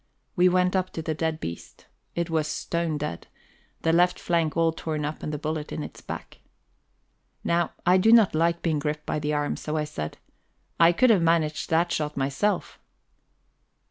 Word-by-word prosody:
We 180 -1 +5
went 180 +1 +2
up 185 -1 +1
to 160 - -4
the 155 - -1
dead 160 0 -2
beast. 85 +1 -8 0.3
It 170 0 -2
was 155 -2 +1
stone 165 0 -2
dead, 145 - -5 0.6
the 165 - +3
left 180 +1 +4
flank 165 -2 0
all 165 -1 +3
torn 155 -2 -3
up 150 +1 -5
and 150 - -4
the 150 - -3
bullet 155 0 -4
in 155 - -4
its - - -9
back. - - -8 1.0
Now 170 0 +1
I 180 +2 +5
do 220 +4 +4
not 225 -4 +6
like 170 +2 +1
being 160 -3 +1
gripped 150 +1 -3
by - - -1
the 150 0 -1
arm, 145 0 0
so 155 +1 -4
I 155 - +1
said: 75 - -5 0.6
"I 165 0 +7
could 245 +7 +4
have 200 -5 +4
managed 165 -2 +1
that 170 +1 +2
shot 150 -1 -2
myself." 140 +10 -1
160 Hz, 185 wpm, -26 LUFS, 150-170 Hz, 1.0 s, I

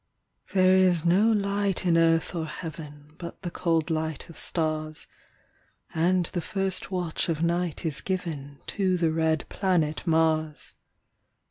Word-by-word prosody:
There 185 -1 +5
is 180 -3 +3
no 195 +6 +4
light 200 -2 0
in 170 -2 +3
earth 165 0 +3
or 165 -2 -3
heaven, 150 -2 -8
But 170 +2 -8
the 175 - -3
cold 165 -2 0
light 160 0 -3
of 165 - -12
stars; 155 -2 -1 0.9
And 175 +2 +2
the 175 - -1
first 195 +1 -2
watch 180 -3 -2
of 160 0 -1
night 170 -1 -1
is 155 -3 0
given 155 -7 -4
To 190 -3 0
the 165 -2 +2
red 160 -1 0
planet 175 -4 0
Mars. 160 -2 +1
165 Hz, 140 wpm, -27 LUFS, 160-185 Hz, 0.9 s, There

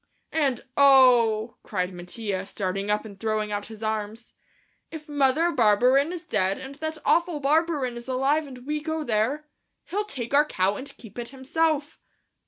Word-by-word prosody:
"And, 275 -6 +1
oh," 245 -5 +5
cried 185 -2 -3
Mattia, 190 +2 -5
starting 195 0 -3
up 210 +1 0
and 200 -2 -11
throwing 215 -1 -1
out 205 0 -3
his 220 0 -10
arms, 220 +1 -4 0.6
"if 315 -1 -9
Mother 290 +3 +2
Barberin 250 +4 +3
is 355 -2 -6
dead 195 -1 0
and 270 +1 -8
that 315 +2 -5
awful 340 -2 +2
Barberin 290 -3 +1
is 240 +1 -9
alive 275 +4 +1
and 255 -2 -11
we 300 +1 -2
go 315 0 -3
there, 250 +5 0 0.4
he'll 415 +3 -2
take 255 - -5
our 290 +1 +6
cow 190 -8 0
and 270 +6 -6
keep 230 0 -11
it 235 -1 -5
himself." 290 +3 -1
255 Hz, 165 wpm, -25 LUFS, 215-295 Hz, 0.6 s, our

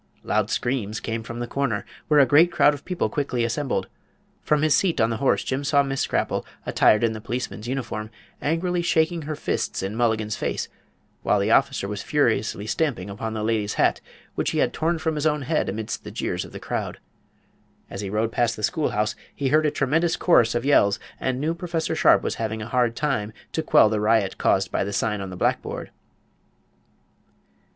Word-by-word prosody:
Loud - - 0
screams 110 -4 -1
came 115 0 -3
from 115 +1 -7
the 120 - -3
corner, 120 -4 -2 0.2
where 150 -1 +5
a 140 - +7
great 155 +7 +5
crowd 150 - +4
of 145 - -9
people 180 -1 -1
quickly 135 -5 -1
assembled. 120 -4 -1 0.5
From 150 0 +1
his 155 -1 +4
seat 180 -4 +1
on 115 0 +3
the 115 - -1
horse 135 +3 +2
Jim 135 +2 -2
saw 140 0 +3
Miss 135 -1 -2
Scrapple, - - 0 0.2
attired 105 +2 +4
in 115 -1 +2
the 110 - -7
policeman's 120 -1 -4
uniform, 120 -4 -4 0.3
angrily 175 +3 0
shaking 165 0 +1
her 155 0 -4
fists - - -2
in 95 +3 -3
Mulligan's 110 -2 0
face, - - -3 0.5
while - - +2
the - - +1
officer 100 - +2
was 105 0 -4
furiously 115 -7 0
stamping 110 - -1
upon 110 +2 -4
the 110 - -2
lady's 110 -2 0
hat, - - +2 0.3
which - - -1
he - - -2
had - - +2
torn 165 +2 0
from 160 0 -1
his 150 0 0
own 150 -2 0
head 150 -2 0
amidst 105 +2 -4
the - - -7
jeers - - -3
of - - -12
the - - -8
crowd. - - -4 0.9
As 100 - -6
he 100 - -4
rode 110 +3 0
past 115 -1 +1
the 110 - -8
schoolhouse 105 -11 0 0.2
he 140 -2 -1
heard 155 +2 +4
a - - +3
tremendous 155 +4 +1
chorus 120 -10 +3
of 120 +2 -1
yells, 105 -7 +4 0.2
and 130 -1 -1
knew 155 +4 0
Prof. 170 -1 -3
Sharpe - - +5
was - - -2
having 110 0 -2
a - - -7
hard 120 -1 +1
time 115 -8 -1 0.2
to 160 - -1
quell 155 - +5
the 110 -1 0
riot 105 -2 +1
caused 95 +1 +2
by - - 0
the 100 +1 -4
sign 105 -2 0
on 95 - -5
the 90 - -8
blackboard. - - -2
120 Hz, 200 wpm, -24 LUFS, 110-150 Hz, 0.9 s, a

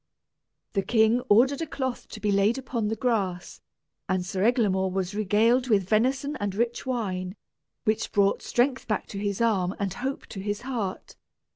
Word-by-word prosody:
The 195 - +2
king 220 +3 +3
ordered 260 +8 +4
a 325 - -2
cloth 260 -4 -4
to - - -9
be 210 - 0
laid 200 +4 +3
upon 245 -4 -2
the 220 - -1
grass, 200 -7 -2 0.5
and 185 -1 0
Sir 185 +1 -3
Eglamour 205 -5 +2
was 190 0 -2
regaled 220 +5 +2
with 200 -5 +3
venison 265 +7 +1
and 205 -2 -3
rich 235 +4 -1
wine, 190 -7 -2 0.5
which 215 0 0
brought 200 -2 +2
strength 260 +2 0
back 215 - -1
to 195 - -5
his 200 +1 -2
arm 195 -5 +1
and 195 -3 -2
hope 260 +5 -4
to 195 - -7
his 205 +2 -3
heart. 235 -7 -4
215 Hz, 170 wpm, -26 LUFS, 195-245 Hz, 0.5 s, ordered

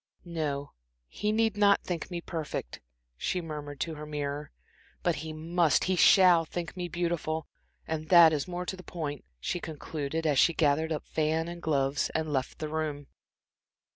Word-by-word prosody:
"No, 150 -4 -3 0.4
he 210 - -2
need 220 -1 +2
not 200 -1 +4
think 175 -3 -4
me 175 -2 -4
perfect," 160 - -5 0.4
she 180 - -1
murmured 150 -4 -6
to 165 - -1
her 150 0 -8
mirror, 145 0 -3 0.5
"but 175 -2 +1
he 160 +1 -5
must 160 -1 +2
he 185 - +1
shall 180 -1 +7
think 170 +2 -5
me 180 -1 -3
beautiful. 170 -2 -2 0.4
And 155 -1 -3
that 170 -3 +8
is 145 -2 -1
more 180 0 -4
to 190 - -3
the 185 - -11
point," 150 -6 -5 0.2
she 175 - -2
concluded, 160 0 -4
as 145 -4 +3
she 170 - +5
gathered 160 +1 +2
up 150 - -2
fan 160 +1 0
and 170 0 -7
gloves 140 -3 +1
and 155 -1 -1
left 130 -1 -1
the 155 - -4
room. 150 -2 -3
160 Hz, 170 wpm, -29 LUFS, 150-175 Hz, 0.5 s, that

